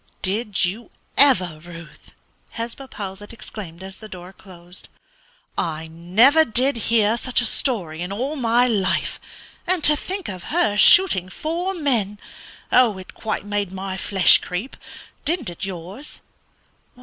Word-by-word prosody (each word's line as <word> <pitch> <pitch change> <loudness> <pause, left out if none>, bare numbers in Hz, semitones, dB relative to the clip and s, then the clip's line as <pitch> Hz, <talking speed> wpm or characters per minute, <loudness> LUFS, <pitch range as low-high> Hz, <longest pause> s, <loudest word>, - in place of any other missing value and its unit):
"Did 205 0 0
you 210 +7 -5 0.3
ever, 185 - +4
Ruth?" 170 -2 -13 0.4
Hesba 235 +4 -6
Powlett 200 +1 -8
exclaimed 190 -6 -8
as 190 +1 -9
the 215 - -11
door 180 0 -10
closed. 180 -2 -13 0.7
"I 160 -1 -3
never 210 - +4
did 260 +2 +1
hear 225 0 +3
such 255 0 0
a 245 - +2
story 185 - -1
in 180 +2 -4
all 260 +9 -3
my 240 -2 +2
life. 205 -6 0 0.5
And 360 -3 +1
to 300 - +6
think 380 +5 -5
of 185 -3 -7
her 310 -11 +1
shooting 205 - +6
four 345 - -3
men! 235 - 0 0.5
It 210 -7 +2
quite 215 -2 -4
made 205 -2 -2
my 190 0 -5
flesh 190 0 +5
creep; 185 +9 -5 0.5
didn't 300 - -1
it 175 +3 -5
yours?" 190 - -8
205 Hz, 135 wpm, -22 LUFS, 185-255 Hz, 0.7 s, to